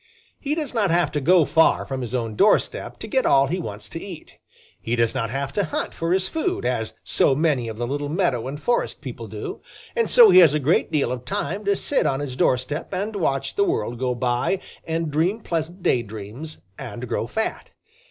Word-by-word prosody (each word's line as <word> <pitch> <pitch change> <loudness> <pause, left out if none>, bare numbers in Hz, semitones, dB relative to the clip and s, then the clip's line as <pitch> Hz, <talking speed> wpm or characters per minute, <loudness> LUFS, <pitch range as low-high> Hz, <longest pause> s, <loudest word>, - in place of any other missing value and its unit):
He 295 +1 -2
does 300 -5 -2
not 215 -5 +1
have 170 +1 +2
to 150 - -2
go 170 +2 +5
far 160 +3 +3
from 135 -1 -4
his 125 0 -3
own 115 -3 -2
doorstep 205 - +2
to - - -7
get 265 -3 +1
all 135 0 +4
he 175 +7 -2
wants 105 - -6
to 165 - -7
eat. 180 -6 -10 0.4
He 115 - -1
does 115 -1 +2
not 120 -4 -2
have 135 +2 -3
to 205 - +1
hunt 155 - -3
for 165 +1 -2
his 190 0 +2
food, 370 +4 -2
as - - -2
so 135 - +2
many 145 -6 +1
of 110 -1 -6
the 120 - -2
little 145 +3 -3
meadow 150 - 0
and 145 +2 -5
forest 240 +10 -1
people - - -7
do, - - -6 0.4
and 465 -1 +1
so 475 -3 +8
he - - +8
has 160 -5 +6
a - - +2
great 150 +4 +1
deal 150 -5 +1
of 125 -1 -4
time 195 +10 -3
to 200 0 +3
sit 280 - +1
on 135 - 0
his 140 -3 -4
doorstep 130 +3 0
and 200 +3 -3
watch 140 -8 -1
the 405 - +2
world 120 - -1
go 125 -1 0
by 125 +9 0 0.3
and 165 -1 -2
dream 170 +9 +1
pleasant 170 -2 -4
daydreams 115 +6 -3 0.2
and 125 -1 -6
grow 115 -1 -2
fat. 220 - -3
150 Hz, 215 wpm, -23 LUFS, 125-190 Hz, 0.4 s, so